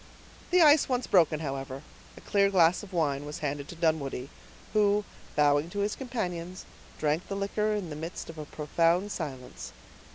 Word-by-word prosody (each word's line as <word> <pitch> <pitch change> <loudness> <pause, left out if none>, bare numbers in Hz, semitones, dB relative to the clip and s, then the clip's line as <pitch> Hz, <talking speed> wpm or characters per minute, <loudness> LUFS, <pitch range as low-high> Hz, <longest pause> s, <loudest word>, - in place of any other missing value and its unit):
The 360 -1 +5
ice 300 -1 +6
once 250 -1 0
broken, 160 -4 +3
however, 135 -1 -5 0.3
a - - -11
clear 200 -1 +2
glass 180 -2 +4
of 205 -2 -11
wine 145 -5 0
was 150 0 -6
handed 140 0 -3
to - - -9
Dunwoodie, 155 -5 -1 0.4
who, 210 -1 +3 0.3
bowing 145 +2 +3
to 205 - -5
his 205 +1 0
companions, 185 -8 -4 0.3
drank 155 +3 0
the 200 - -4
liquor 210 +2 0
in 185 -6 -4
the - - -5
midst 165 +4 -6
of 165 -1 -9
a 150 - -5
profound 165 +6 +1
silence. 130 - -6
170 Hz, 170 wpm, -29 LUFS, 150-200 Hz, 0.4 s, ice